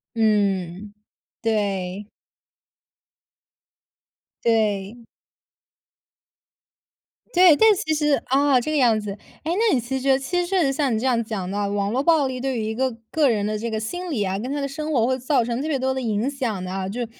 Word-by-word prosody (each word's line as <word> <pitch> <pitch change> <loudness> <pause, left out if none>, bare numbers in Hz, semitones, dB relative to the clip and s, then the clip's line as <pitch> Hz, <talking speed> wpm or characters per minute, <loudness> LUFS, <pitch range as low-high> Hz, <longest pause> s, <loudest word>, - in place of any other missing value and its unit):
嗯， 200 -3 0 0.5
对。 200 -2 -2 2.3
对。 215 -1 0 2.3
对， 360 -3 +7
但 440 +7 +5
是 - - -3
其 315 - +1
实 300 -2 +2
啊， 275 0 +3
这 310 +6 -3
个 305 - +1
样 235 -5 +4
子， 210 -1 -5 0.3
诶， 320 - -2
那 440 +2 +2
你 250 - +2
其 240 - -9
实 265 - -2
觉 275 - 0
得 265 - +4
其 355 +7 -1
实 350 - -3
确 370 -1 +2
实 275 -2 +1
像 270 -5 0
你 - - 0
这 245 - -3
样 240 -3 +2
讲 195 -4 -4
到， 205 0 -1
网 200 0 -1
络 265 - +1
暴 315 -2 +3
力 255 -1 -4
对 265 -2 -1
于 220 - -2
一 220 - -2
个 260 +2 0 0.2
个 300 -4 +3
人 210 -3 0
的 215 0 -1
这 235 - -3
个 220 -1 -2
心 355 +11 -5
理 225 -9 -1
啊， 190 0 -2
跟 250 +5 -4
他 290 - -2
的 280 - -2
生 305 +3 -5
活 240 -6 +2
会 260 +1 0
造 255 -1 +1
成 235 +2 -2
特 305 - -3
别 295 - 0
多 265 0 0
的 265 - -3
影 220 0 -1
响 240 -9 -3
的 180 - -5
啊， 190 0 -3
就 240 +4 -3
245 Hz, 220 characters per minute, -23 LUFS, 210-280 Hz, 2.3 s, 对